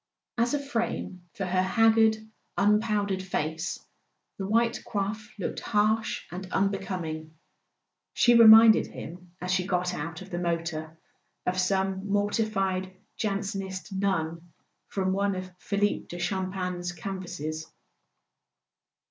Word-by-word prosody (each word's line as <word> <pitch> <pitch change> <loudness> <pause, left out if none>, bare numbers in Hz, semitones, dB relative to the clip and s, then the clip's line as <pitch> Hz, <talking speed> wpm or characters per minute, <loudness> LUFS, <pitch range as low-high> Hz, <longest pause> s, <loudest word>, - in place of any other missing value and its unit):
As 240 +4 +1
a - - 0
frame 230 -9 -3
for 195 - -3
her 185 0 +1
hag¬ 225 +4 +4
gard 220 -1 +5 0.4
unpowdered 205 -2 +2
face 160 -2 -2 0.6
the 195 - -2
white 230 +2 +2
coif 210 +1 -3
looked 195 - -3
harsh 215 +1 +1
and 185 +1 -7
unbecoming; 180 -5 -2 0.8
she 240 - +4
reminded 225 -1 +9
him, 175 +1 -10
as 180 0 -3
she 185 0 +1
got 180 -1 0
out 165 +2 -5
of 190 - -14
the 175 - -2
motor, 165 -2 -3 0.5
of 185 0 0
some 190 +1 0
mortified 200 -2 0 0.2
Jansenist 195 -2 -3
nun 170 -3 -1 0.4
from 190 -1 -1
one 200 0 +1
of 185 0 -6
Philippe 205 0 0
de 175 - -7
Champaigne's 180 -1 -2
canvases. 175 -4 -5
190 Hz, 120 wpm, -28 LUFS, 180-205 Hz, 0.8 s, reminded